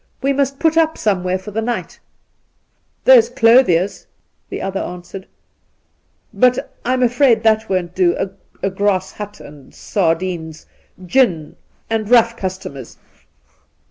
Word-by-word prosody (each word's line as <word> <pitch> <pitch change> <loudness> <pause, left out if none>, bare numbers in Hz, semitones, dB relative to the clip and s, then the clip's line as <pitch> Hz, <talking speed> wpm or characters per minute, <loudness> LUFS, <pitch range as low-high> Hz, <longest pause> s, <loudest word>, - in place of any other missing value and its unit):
We 275 +1 +2
must 275 0 -1
put 320 +1 +1
up 320 -1 +2
somewhere 185 -3 0
for 190 +3 -10
the 220 +2 -2
night 240 +2 -4 0.4
!' - - -47
' - - -46
There's 240 -3 +7
Clothier's,' 230 -7 +3 0.4
the - - -5
other 195 0 -3
answered; 180 +2 -8 0.6
' - - -45
but 250 -1 +2
I'm 255 +1 0
afraid 245 -2 +3
that 220 0 +2
won't 180 -2 -2
do 180 -2 +2 0.3
— - - -35
a 195 - +1
grass 190 -1 0
hut, 205 -1 -9
and 145 -2 -14
sardines, 165 -3 -2 0.4
gin, 175 - +1 0.3
and 220 -2 -2
rough 235 -1 +4
customers. 185 - -7
205 Hz, 140 wpm, -18 LUFS, 180-245 Hz, 0.6 s, There's